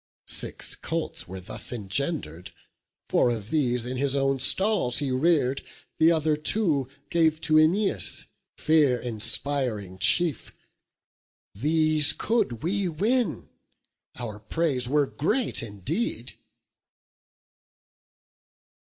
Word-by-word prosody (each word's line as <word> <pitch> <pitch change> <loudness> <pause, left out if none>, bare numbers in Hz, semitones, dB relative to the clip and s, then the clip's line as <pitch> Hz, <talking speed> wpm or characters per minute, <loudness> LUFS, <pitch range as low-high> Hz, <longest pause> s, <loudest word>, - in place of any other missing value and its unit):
Six - - -3
colts - - -4
were 95 +1 -7
thus 90 - -5
engender'd: 100 - -2 0.6
four - - +2
of 110 -2 -4
these 125 -6 +1
In 125 +1 -4
his 140 +1 0
own 135 -1 +1
stalls 190 - +2
he 140 -3 0
rear'd; 135 -1 +1 0.4
the 160 +1 +6
other 155 -2 +2
two 150 - 0 0.2
Gave 160 -2 +2
to 155 - -1
Æneas, 155 - +2 0.3
fear 150 -6 +3
inspiring 115 -3 -2
chief: 160 - +3 1.0
These 155 +5 +2
could 210 - -1
we 195 +3 0
win, 215 +4 -1 0.7
our 110 -4 -6
praise 130 +2 -1
were 145 +1 +3
great 215 - -1
indeed." 105 - -4
140 Hz, 100 wpm, -26 LUFS, 120-160 Hz, 1.0 s, the